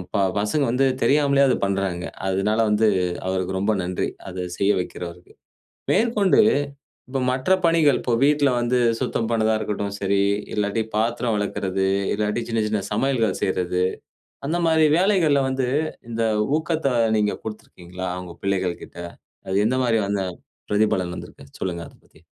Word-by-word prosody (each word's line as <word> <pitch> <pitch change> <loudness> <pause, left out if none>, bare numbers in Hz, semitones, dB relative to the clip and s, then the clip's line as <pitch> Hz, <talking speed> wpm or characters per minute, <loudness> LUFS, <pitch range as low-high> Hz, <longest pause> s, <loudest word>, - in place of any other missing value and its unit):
ப - - +3 0.2
பசங்க 120 +8 +1
வந்து 135 +2 +2 0.2
தெரியாமலே 140 -1 +4
அத - - +3
பண்றாங்க. 95 -3 -1 0.2
அதுனால 95 +4 +1
வந்து, 105 +1 +3 0.4
அவருக்கு 95 0 -1
ரொம்ப 105 +2 +1
நன்றி. 90 0 -2 0.2
அத 90 0 -4
செய்ய 100 +1 +3
வைக்கிறவருக்கு. 90 0 -7 0.6
மேற்கொண்டு, 220 -4 +3 0.7
இப்போ 135 0 -2
மற்ற 130 +7 -2 0.2
பணிகள், 165 -4 +4
இப்போ 120 - 0
வீட்ல 145 -1 +4
வந்து 120 +1 +1 0.2
சுத்தம் 115 - -1
பண்ணதா 110 -1 +2
இருக்கட்டும் 100 -1 -3
சரி, 100 0 +1 0.3
இல்லாட்டி 105 +1 0
பாத்திரம் 115 +1 0
வெளக்குறது, 95 -2 -1 0.3
இல்லாட்டி 105 +2 -1
சின்ன, 115 -1 0
சின்ன 105 -1 0
சமையல்கள 115 -3 +1
செய்றது, 90 -1 0 0.6
அந்த 170 +4 0
மாரி 160 -1 +4
வேலைகள்ல 175 -8 +3
வந்து, 130 -1 -1 0.4
இந்த 115 0 -2 0.4
ஊக்கத்த 160 -4 -1 0.3
நீங்க 105 -1 +1
குடுத்திருக்கீங்களா? 90 -4 -7
அவுங்க 90 -2 -8
பிள்ளைகள் 95 -3 -1
கிட்ட. - - -15 0.5
அது 95 - 0
எந்த 130 +2 +1
மாரி, 115 -2 +2
அந்த 100 -2 0 0.5
பிரதிபலன் 95 -4 +1
வந்திருக்கு? 70 - -11
சொல்லுங்க 85 -2 -3
அதைப் - - -22
பத்தி. - - -24
110 Hz, 140 wpm, -23 LUFS, 95-135 Hz, 0.7 s, தெரியாமலே